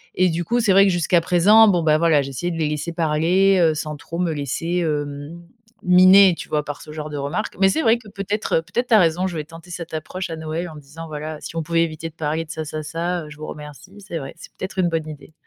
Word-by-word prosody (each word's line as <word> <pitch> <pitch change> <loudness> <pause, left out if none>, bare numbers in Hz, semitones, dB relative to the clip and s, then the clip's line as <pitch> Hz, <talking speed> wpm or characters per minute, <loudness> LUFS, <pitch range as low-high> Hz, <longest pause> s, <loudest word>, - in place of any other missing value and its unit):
et 185 0 +3
du 170 +1 -2
coup, 240 +8 0
c'est 215 -4 +2
vrai 195 +1 +6
que 195 - +3
jusqu'à 175 0 +2
présent, 190 +6 +5
bon, 175 -4 +2
bah, 155 -1 +3
voilà, 160 -4 +3
j'essayais 140 +6 -4
de 165 - -5
les 155 -2 0
laisser 150 +3 -3
parler, 175 +4 +2
heu, 160 -2 +3
sans 155 0 -4
trop 165 +3 -8
me 175 -3 0
laisser, 150 +5 -3
hem, 145 0 -3 0.4
miner, 185 +1 +7
tu - - -9
vois? 150 -1 -1
Par 145 -1 -6
ce - - -11
genre 150 0 -6
de 145 - -5
remarque. 140 +10 -3
Mais 195 - +6
c'est 320 - 0
vrai 225 +1 +4
que 215 -3 -15
peut-être, 200 -3 -1
peut-être 235 +9 -3
tu 230 - +2
as - - +7
raison, 175 +2 +2
je 175 -3 -5
vais 150 - -3
tenter 165 +3 -14
cette 170 -1 -7
approche 170 +3 -5
à - - -3
Noël 160 +2 -4
en 155 - -11
disant: 150 +3 -10
«Voilà, 155 0 -6
si 165 - -8
on 165 - -1
pouvait 165 +1 +1
éviter 160 0 -5
de 155 - -23
parler 160 +1 -2
de - - -26
ça, 160 - -5
ça, 155 +1 -5
ça, 170 +2 -3
heu, - - -11
je 150 - -12
vous 155 - -7
remercie». 150 +5 -10
C'est 170 - -4
vrai, 135 -3 -7
c'est - - -13
peut-être 190 0 -5
une 175 -2 +2
bonne 160 -2 -2
idée. 150 0 -11
165 Hz, 270 wpm, -21 LUFS, 155-180 Hz, 0.4 s, miner